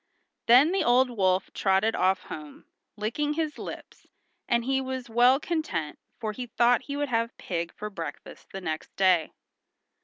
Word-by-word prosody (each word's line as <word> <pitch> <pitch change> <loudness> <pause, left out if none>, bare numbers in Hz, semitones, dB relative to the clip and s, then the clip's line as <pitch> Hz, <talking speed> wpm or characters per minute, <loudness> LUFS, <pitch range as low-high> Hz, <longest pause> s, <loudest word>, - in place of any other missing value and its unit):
Then 255 +8 +7
the 390 - +1
old 250 +1 +4
wolf 190 -4 +1
trotted 195 +3 +2
off 185 0 +2
home, 150 -2 -9 0.3
licking 245 +8 -1
his 310 -1 -3
lips, - - -9 0.4
and 235 0 +1
he 265 0 +1
was 260 -2 -5
well 245 +3 +5
content, 310 - -3 0.2
for 220 -3 -2
he 245 +3 -6
thought 240 0 +3
he 285 0 -4
would 290 -1 -1
have 230 -1 -1
pig 170 -2 -3
for 210 0 -6
breakfast 165 -6 -8
the 195 - -6
next 155 -3 -5
day. 185 -4 +3
230 Hz, 160 wpm, -27 LUFS, 190-260 Hz, 0.4 s, Then